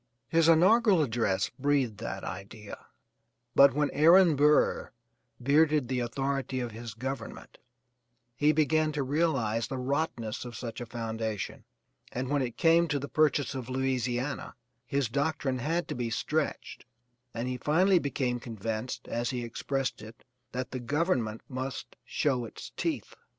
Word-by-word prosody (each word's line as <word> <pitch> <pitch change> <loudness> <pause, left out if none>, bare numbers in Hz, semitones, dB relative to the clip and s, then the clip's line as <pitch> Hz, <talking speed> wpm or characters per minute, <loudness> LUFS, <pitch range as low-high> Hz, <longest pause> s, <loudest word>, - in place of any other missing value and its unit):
His 165 -1 +4
inaugural 190 +2 +5
address 115 -7 0
breathed 135 -6 +1
that - - -5
idea, 100 +3 -8 0.7
but 140 -1 +7
when 150 -1 +1
Aaron 165 +2 +6
Burr 150 +2 +3 0.5
bearded 145 0 +3
the 130 -1 0
authority 135 +2 -2
of 120 -2 -3
his 115 0 -8
government 130 +3 -6 0.8
he 150 +5 +4
began 155 +1 +2
to 145 -2 -1
realize 130 -6 0
the 135 - -4
rottenness 130 -4 -2
of 120 -2 -8
such 120 +1 -6
a 120 - -6
foundation, 110 -2 -4 0.5
and 130 +1 -3
when 145 -1 +1
it 120 -3 -3
came 165 +1 +4
to 150 - 0
the 140 +1 -4
purchase 150 -2 +2
of 130 -2 -6
Louisiana, 130 0 -2 0.3
his 140 +1 0
doctrine 140 +1 -1
had 165 +7 -1
to - - -1
be 120 -2 -2
stretched, 150 +7 -2 0.5
and 120 +1 -4
he 125 0 -2
finally 180 +8 +3
became 130 -4 -1
convinced, 115 +1 -5
as 120 0 -2
he 125 -2 -3
expressed 130 +2 -3
it, 110 +2 -12 0.3
that 130 0 -4
the 130 - -3
Government 125 - 0
must 130 0 -5
show 130 -5 0
its - - -10
teeth. - - -3
130 Hz, 145 wpm, -29 LUFS, 120-150 Hz, 0.8 s, but